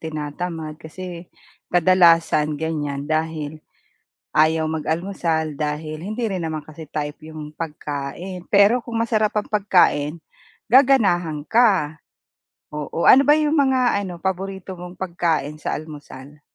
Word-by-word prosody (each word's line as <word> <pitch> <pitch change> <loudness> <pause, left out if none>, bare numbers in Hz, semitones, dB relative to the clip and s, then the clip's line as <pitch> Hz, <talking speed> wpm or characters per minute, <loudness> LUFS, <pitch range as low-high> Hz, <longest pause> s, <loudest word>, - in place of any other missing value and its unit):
tinatamad 155 +1 -5
kasi 175 +1 -9 0.4
kadalasan 165 -4 +4
ganyan 145 -3 -3
dahil 155 -1 -2 0.8
ayaw 160 +1 +3
mag-almusal, 160 -1 -2
dahil 155 +1 -4
hindi 215 +4 -2
rin 185 -5 -3
naman 160 -1 -3
kasi 155 +1 -11
type 150 -1 -3
'yong 155 -1 -9
pagkain, 160 +3 -6
pero 205 +4 +5
kung 230 0 -4
masarap 215 -2 +1
ang 210 - -7
pagkain, 175 -7 +2 0.5
gaganahan 210 - +4
ka. 200 -10 +3 0.8
Oo, 150 +2 -3
ano 265 - +8
ba 295 +2 +5
'yong 305 -1 +1
mga 260 -7 +3
ano, 185 -3 -6
paborito 190 +1 -4
mong 180 0 -9
pagkain 165 -5 -2
sa - - -2
almusal? 145 -2 -11
165 Hz, 120 wpm, -22 LUFS, 155-195 Hz, 0.8 s, ano